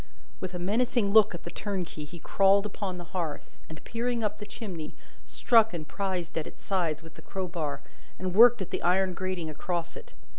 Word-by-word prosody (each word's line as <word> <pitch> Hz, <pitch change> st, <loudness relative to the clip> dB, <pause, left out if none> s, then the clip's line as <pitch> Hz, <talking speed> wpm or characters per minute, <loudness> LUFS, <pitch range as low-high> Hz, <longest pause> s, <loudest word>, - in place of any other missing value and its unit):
With 185 Hz, -1 st, -5 dB
a -, -, -1 dB
menacing 210 Hz, +3 st, +1 dB
look 215 Hz, -5 st, +6 dB
at 170 Hz, -, -9 dB
the 170 Hz, -, -6 dB
turnkey 185 Hz, -7 st, -4 dB
he 170 Hz, +4 st, -10 dB
crawled 195 Hz, +4 st, +3 dB
upon 200 Hz, -3 st, -4 dB
the 175 Hz, -, -6 dB
hearth, 165 Hz, -5 st, -4 dB
and, 160 Hz, -1 st, -10 dB
peering 235 Hz, 0 st, -2 dB
up 210 Hz, -1 st, -2 dB
the 210 Hz, -, -7 dB
chimney, 175 Hz, -8 st, -6 dB, 0.3 s
struck 225 Hz, -5 st, +4 dB
and 155 Hz, -2 st, -5 dB
prised 185 Hz, -4 st, -3 dB
at 155 Hz, -, -5 dB
its -, -, -12 dB
sides 170 Hz, -5 st, -1 dB
with 165 Hz, -1 st, -12 dB
the -, -, -13 dB
crowbar, 170 Hz, -7 st, -4 dB, 0.4 s
and 185 Hz, -1 st, -3 dB
worked 230 Hz, 0 st, +7 dB
at -, -, -12 dB
the -, -, -2 dB
iron 185 Hz, +1 st, +2 dB
grating 185 Hz, -2 st, -3 dB
across 170 Hz, +2 st, -3 dB
it. -, -, -11 dB
185 Hz, 195 wpm, -28 LUFS, 170-205 Hz, 0.4 s, worked